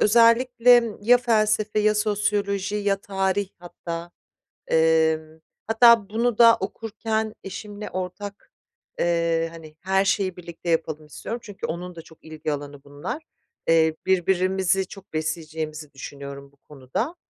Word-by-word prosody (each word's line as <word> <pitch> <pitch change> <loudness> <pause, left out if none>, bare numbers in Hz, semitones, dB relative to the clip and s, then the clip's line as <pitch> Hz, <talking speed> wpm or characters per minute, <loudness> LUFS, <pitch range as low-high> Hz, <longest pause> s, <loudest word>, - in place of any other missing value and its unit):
özellikle 235 +1 +5
ya 245 +4 +5
felsefe, 215 -2 +1
ya 215 0 +3
sosyoloji, 205 -1 0
ya 205 -1 +1
tarih 195 0 -1
hatta. 170 -1 -7 0.6
Emm, 160 -1 +2 0.3
hatta 225 -2 +6
bunu 230 +1 0
da 230 -1 +8
okurken 220 +1 -3
eşimle 205 +2 -7
ortak, 185 +2 -6 0.5
eee, 170 -1 +1
hani, 155 -2 -12
her 190 +1 +2
şeyi 190 -2 0
birlikte 170 -1 -6
yapalım 155 -2 -1
istiyorum. 230 +10 -6
Çünkü 205 -3 -6
onun 180 +2 -5
da 165 - -9
çok 160 -1 -19
ilgi 155 -1 -4
alanı 145 -1 -7
bunlar. 145 - -6 0.5
Eee, 160 -1 +4
birbirimizi 190 +1 +2
çok 195 -2 -13
besleyeceğimizi 155 -1 -4
düşünüyorum 140 0 -9
bu - - -29
konuda. 145 - -5
190 Hz, 125 wpm, -24 LUFS, 160-215 Hz, 0.6 s, da